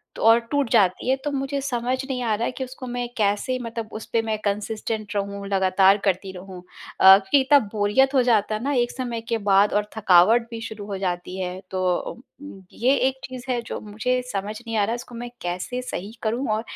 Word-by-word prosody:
तो - - -8
और 225 +1 +7
टूट 285 -4 +1
जाती 200 0 +3
है, 260 - +4
तो 275 +2 -5
मुझे 275 0 -2
समझ 250 -1 -1
नहीं 265 -2 -3
आ 225 -2 +1
रहा 230 +3 -2
है - - -1
कि 260 - -5
उसको 255 0 -8
मैं 245 0 -3
कैसे 210 +5 +1
मतलब 230 -2 -5
उसपे 225 +1 -1
मैं 220 -1 -2
कंसिस्टेंट 210 +1 -3
रहूँ 200 0 -3
लगातार 190 0 +4
करती 190 0 0
रहूँ 185 0 -10 0.4
अ, - - 0
क्योंकि 200 +8 +2
इतना 280 +2 +5
बोरियत 215 +6 +2
हो 265 - +5
जाता 220 -3 +2
है 215 - -5
ना 285 +2 0
एक 240 -2 +1
समय 240 -3 -4
के 230 - +1
बाद 200 +1 +4
और 210 0 0
थकावट 220 +4 +5
भी 230 -1 -6
शुरू 220 -2 -7
हो 200 -1 -4
जाती 180 -1 -3
है, 180 0 -4
तो 185 -1 -1
अम 240 - -7 0.3
उम, 195 - -14
ये 255 +4 +2
एक 265 0 -3
चीज़ 255 -1 -9
है 245 -2 0
जो 230 - -6
मुझे 235 +5 -1
समझ 205 +2 -3
नहीं 230 -2 -5
आ 210 - +3
रहा, 225 +3 -1
उसको 240 0 -9
मैं 240 +1 -6
कैसे 180 +8 -3
सही 205 -5 -6
करूँ 235 +5 -1
और 215 - -1
225 Hz, 220 wpm, -23 LUFS, 200-250 Hz, 0.4 s, और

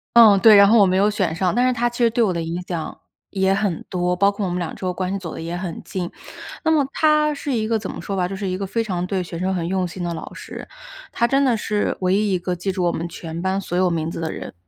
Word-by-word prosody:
嗯， 215 -4 +8
对， 220 0 +8
然 200 0 +8
后 225 +1 +5
我 200 - +7
没 185 +1 +2
有 205 +2 +4
选 185 -6 -1
上， 180 0 0
但 250 +2 +3
是 255 - +2
她 240 0 +1
其 240 - -10
实 235 -1 +4
对 230 +1 +1
我 190 -4 +1
的 170 - -2
影 165 +2 -3
响 170 -3 -5 0.3
也 190 -1 +1
很 195 -4 -1
多， 180 -1 0
包 200 +2 +3
括 200 0 -5
我 185 - -1
们 175 - -2
两 175 -3 -3
之 - - -12
后 180 - 0
关 185 +1 -3
系 195 - -2
走 165 -3 -7
得 - - -7
也 170 +2 -4
很 175 -2 -5
近。 180 -2 -4 0.5
那 320 - +2
么 300 -3 +4
她 305 -1 +3
是 280 -1 -4
一 220 -2 0
个 225 -1 +1
怎 205 -3 -6
么 - - -8
说 200 - -4
吧 180 -1 0
就 195 - -5
是 195 0 -4
一 185 0 -2
个 195 - -3
非 230 +4 -1
常 180 -4 -2
对 190 0 -1
学 170 -1 -6
生 190 +2 -1
很 170 -2 -2
用 185 -1 0
心 175 +1 -7
的 170 - -2
老 160 - -8
师， - - -9 0.4
她 235 - +1
真 275 +1 +2
的 245 -3 +3
是 210 -1 -1
唯 185 0 +2
一 205 -1 +1
一 180 - +1
个 180 0 -2
记 190 +3 -2
住 185 -1 -2
我 170 - +2
们 170 +1 -3
全 165 -1 -7
班 190 +2 -1
所 175 -1 -3
有 185 0 +3
名 165 -1 -1
字 - - -6
的 160 -1 -3
人。 - - -7
190 Hz, 330 characters per minute, -21 LUFS, 175-215 Hz, 0.5 s, 嗯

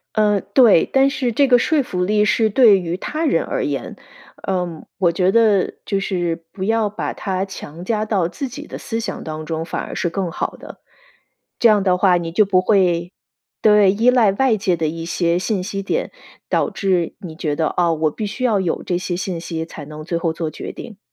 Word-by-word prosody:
嗯， 210 -2 +2
对， 235 -10 +6
但 270 0 +4
是 265 -3 -1
这 275 +5 +3
个 245 -2 +5
说 305 +2 +2
服 180 -7 -2
力 210 +2 +2
是 220 +2 +2
对 215 -3 +6
于 175 -1 -3
他 310 - -3
人 - - +2
而 - - -2
言。 - - -3 0.5
呃， 180 -4 -3 0.2
我 180 -3 +2
觉 180 +2 +1
得 215 -3 +3
就 195 - -1
是 175 -4 -2
不 190 - -6
要 220 +1 +1
把 210 - -4
它 190 -1 -2
强 175 -3 -9
加 215 +1 0
到 195 -6 0
自 180 +11 -5
己 290 +4 -9
的 - - -8
思 225 -3 -4
想 220 -3 -5
当 155 0 -6
中， 160 0 -3
反 - - -4
而 - - -7
是 175 - -1
更 175 0 -3
好 - - -3
的。 - - -12 0.8
这 235 - +6
样 210 -2 +3
的 185 -2 +2
话， 185 -1 +4
你 170 -1 -4
就 195 +6 +4
不 190 -2 +3
会 180 -3 +1 0.5
对， 210 -3 +5
依 225 +5 +3
赖 240 -5 +4
外 230 +2 +2
界 195 -3 +1
的 160 -1 0
一 165 +1 -5
些 170 0 0
信 190 +1 -1
息 195 0 -4
点， - - -2 0.4
导 - - +1
致 185 -4 0
你 175 -6 -9
觉 155 -3 -2
得， 160 0 0
哦， 170 -2 +3
我 155 -1 0
必 215 - -5
须 220 +5 -5
要 225 -5 +2
有 180 -3 -1
这 175 - -1
些 180 0 -3
信 180 -1 -3
息 165 -1 -4
才 160 -2 -10
能 155 +1 -9
最 170 +2 -2
后 165 -1 -1
做 160 -1 -3
决 155 - -7
定。 215 -4 -10
190 Hz, 235 characters per minute, -20 LUFS, 170-215 Hz, 0.8 s, 对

